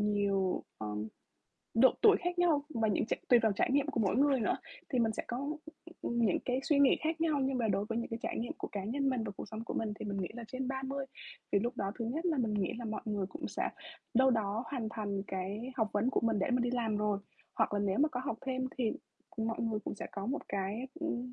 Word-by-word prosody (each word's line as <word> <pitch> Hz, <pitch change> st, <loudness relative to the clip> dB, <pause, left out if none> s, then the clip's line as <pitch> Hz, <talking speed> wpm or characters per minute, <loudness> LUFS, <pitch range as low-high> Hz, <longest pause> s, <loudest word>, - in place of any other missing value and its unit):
nhiều, 200 Hz, -2 st, +1 dB
ờ, 110 Hz, -, -4 dB, 0.9 s
độ 255 Hz, +3 st, +7 dB
tuổi 435 Hz, -2 st, +8 dB
khác 355 Hz, 0 st, -2 dB
nhau 315 Hz, -5 st, +4 dB
và 225 Hz, -2 st, +2 dB
những 210 Hz, -, +1 dB
tr -, -, -3 dB, 0.2 s
tùy 245 Hz, -, +8 dB
vào 220 Hz, -2 st, +4 dB
trải 200 Hz, -, +1 dB
nghiệm 285 Hz, 0 st, +4 dB
của 290 Hz, -, 0 dB
mỗi 200 Hz, -1 st, +2 dB
người 275 Hz, -1 st, +4 dB
nữa 220 Hz, -, +2 dB, 0.3 s
thì 260 Hz, -, 0 dB
mình 225 Hz, -2 st, +3 dB
sẽ -, -, -3 dB
có, 240 Hz, -, -2 dB, 0.6 s
ừm, 235 Hz, -, -1 dB
những 190 Hz, -, +3 dB
cái 255 Hz, +1 st, +1 dB
suy 290 Hz, -1 st, +3 dB
nghĩ 280 Hz, -2 st, +6 dB
khác 320 Hz, +1 st, -1 dB
nhau. 310 Hz, -3 st, +2 dB
Nhưng 265 Hz, -1 st, +1 dB
mà 225 Hz, -, +1 dB
đối 200 Hz, 0 st, +2 dB
với 225 Hz, +1 st, -1 dB
những 235 Hz, -, -2 dB
cái 225 Hz, -, -2 dB
trải -, -, -2 dB
nghiệm 235 Hz, -, -2 dB
của -, -, -4 dB
cá 200 Hz, -2 st, -3 dB
nhân 275 Hz, +6 st, 0 dB
mình 255 Hz, -3 st, +1 dB
và 205 Hz, -, -4 dB
cuộc -, -, -6 dB
sống 220 Hz, +1 st, -5 dB
của -, -, -4 dB
mình 220 Hz, -2 st, -1 dB
thì -, -, -3 dB
mình 200 Hz, -1 st, -2 dB
nghĩ 180 Hz, -, -2 dB
là 235 Hz, -1 st, -6 dB
trên 255 Hz, 0 st, -3 dB
30 270 Hz, +1 st, -2 dB, 0.5 s
thì 200 Hz, -, +6 dB
lúc 240 Hz, +4 st, -2 dB
đó 195 Hz, 0 st, -1 dB
thứ 230 Hz, -, -1 dB
nhất 310 Hz, +10 st, -1 dB
là 320 Hz, -5 st, +2 dB
mình 225 Hz, -4 st, +1 dB
nghĩ 195 Hz, -3 st, +1 dB
là 240 Hz, -, -5 dB
mọi 215 Hz, -1 st, -3 dB
người 205 Hz, -3 st, -1 dB
cũng 185 Hz, -, -6 dB
sẽ -, -, -1 dB, 0.5 s
đâu 265 Hz, +2 st, +6 dB
đó 220 Hz, 0 st, 0 dB
hoàn 245 Hz, -5 st, -2 dB
thành 205 Hz, -3 st, -2 dB
cái 200 Hz, +7 st, -3 dB
học 220 Hz, -3 st, +2 dB
vấn 215 Hz, +5 st, +2 dB
của -, -, +2 dB
mình 225 Hz, -2 st, +2 dB
để 195 Hz, -, +1 dB
mình 250 Hz, 0 st, +3 dB
đi 240 Hz, -, +1 dB
làm 230 Hz, -4 st, 0 dB
rồi. 210 Hz, -1 st, +1 dB, 0.4 s
Hoặc -, -, +2 dB
là 205 Hz, -, +1 dB
nếu 200 Hz, -1 st, +1 dB
mà 300 Hz, -, +5 dB
có 250 Hz, -4 st, -3 dB
học 230 Hz, -5 st, -2 dB
thêm 260 Hz, -1 st, 0 dB
thì 230 Hz, -4 st, +2 dB, 0.5 s
mọi 225 Hz, 0 st, -1 dB
người 225 Hz, -2 st, 0 dB
cũng -, -, -3 dB
sẽ -, -, -5 dB
có 200 Hz, 0 st, -4 dB
một 275 Hz, +5 st, -3 dB
cái, 200 Hz, +6 st, -2 dB
ừm, 250 Hz, -6 st, -2 dB
230 Hz, 265 wpm, -33 LUFS, 210-265 Hz, 0.9 s, tuổi